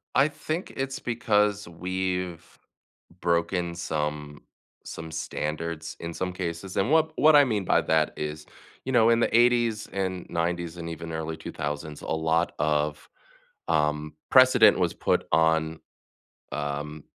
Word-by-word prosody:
I 140 Hz, +2 st, +5 dB
think 155 Hz, +3 st, -5 dB
it's 135 Hz, 0 st, -3 dB
because 105 Hz, -4 st, +1 dB
we've 90 Hz, 0 st, -3 dB, 0.8 s
broken 85 Hz, 0 st, 0 dB
some 75 Hz, -3 st, -4 dB, 0.4 s
some 80 Hz, 0 st, -8 dB
standards 80 Hz, +1 st, -4 dB
in 85 Hz, 0 st, -5 dB
some 90 Hz, +1 st, -3 dB
cases. 90 Hz, +1 st, -5 dB
And 105 Hz, +9 st, +1 dB
what 160 Hz, 0 st, +4 dB
what 155 Hz, 0 st, +6 dB
I 145 Hz, -, +8 dB
mean 105 Hz, -7 st, -1 dB
by -, -, +3 dB
that 80 Hz, -1 st, +1 dB
is, 75 Hz, 0 st, -5 dB, 0.4 s
you 130 Hz, -, -2 dB
know, 115 Hz, -2 st, +5 dB
in 115 Hz, -, +4 dB
the 115 Hz, -, +1 dB
'80s 120 Hz, -3 st, +3 dB
and 95 Hz, -2 st, -3 dB
'90s 85 Hz, 0 st, -2 dB
and 85 Hz, 0 st, -6 dB
even 85 Hz, 0 st, -6 dB
early 80 Hz, 0 st, -4 dB
2000s, 75 Hz, 0 st, -5 dB
lot 80 Hz, +1 st, 0 dB
of, 75 Hz, 0 st, 0 dB, 0.6 s
um, 75 Hz, -1 st, 0 dB, 0.2 s
precedent 130 Hz, -6 st, +7 dB
was 90 Hz, -2 st, +1 dB
put -, -, 0 dB
on, 80 Hz, 0 st, +2 dB, 0.7 s
um, 75 Hz, +1 st, -4 dB
85 Hz, 135 wpm, -26 LUFS, 80-105 Hz, 0.8 s, I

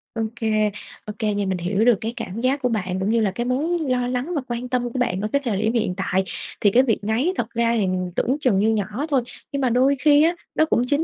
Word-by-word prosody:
Ô 225 Hz, -, -1 dB
kê, 215 Hz, -2 st, +1 dB, 0.3 s
ô 210 Hz, -, -6 dB
kê 215 Hz, -2 st, 0 dB
nha, 205 Hz, 0 st, -1 dB
mình 190 Hz, -1 st, -1 dB
hiểu 195 Hz, +5 st, 0 dB
được 240 Hz, -2 st, +6 dB
cái 225 Hz, +1 st, -3 dB
cảm 190 Hz, +5 st, -5 dB
giác 265 Hz, +3 st, +1 dB
của 250 Hz, -, +1 dB
bạn 190 Hz, -5 st, -2 dB
cũng 190 Hz, -, -1 dB
như 230 Hz, +1 st, +2 dB
là 205 Hz, -3 st, +1 dB
cái 240 Hz, +5 st, -3 dB
mối 300 Hz, +8 st, 0 dB
lo 250 Hz, -1 st, +1 dB
lắng 250 Hz, +7 st, -2 dB
và 290 Hz, -, 0 dB
quan 240 Hz, +1 st, -4 dB
tâm 245 Hz, -1 st, 0 dB
của 255 Hz, -, -2 dB
bạn 190 Hz, -6 st, 0 dB
ở 210 Hz, -, -1 dB
cái 280 Hz, -, +2 dB
thời 210 Hz, -5 st, 0 dB
điểm 220 Hz, +1 st, +1 dB
hiện 220 Hz, -6 st, 0 dB
tại. 190 Hz, -1 st, 0 dB, 0.4 s
Thì 205 Hz, -, +5 dB
cái 250 Hz, +5 st, +5 dB
việc 230 Hz, -5 st, +1 dB
ngáy 230 Hz, -, +1 dB
thật -, -, -2 dB
ra 235 Hz, 0 st, +1 dB
thì 210 Hz, -, +2 dB, 0.3 s
tưởng 260 Hz, +4 st, +1 dB
chừng 245 Hz, -9 st, +2 dB
như 215 Hz, +2 st, +3 dB
nhỏ 215 Hz, +5 st, -1 dB
thôi, 275 Hz, -4 st, +3 dB, 0.3 s
nhưng 280 Hz, -1 st, -2 dB
mà 260 Hz, -, +2 dB
đôi 260 Hz, +4 st, +3 dB
khi 295 Hz, +1 st, +5 dB
á, 335 Hz, +2 st, +3 dB, 0.2 s
nó 315 Hz, -, +4 dB
cũng 275 Hz, -6 st, +1 dB
chính 290 Hz, +3 st, +2 dB
235 Hz, 275 wpm, -22 LUFS, 210-260 Hz, 0.4 s, được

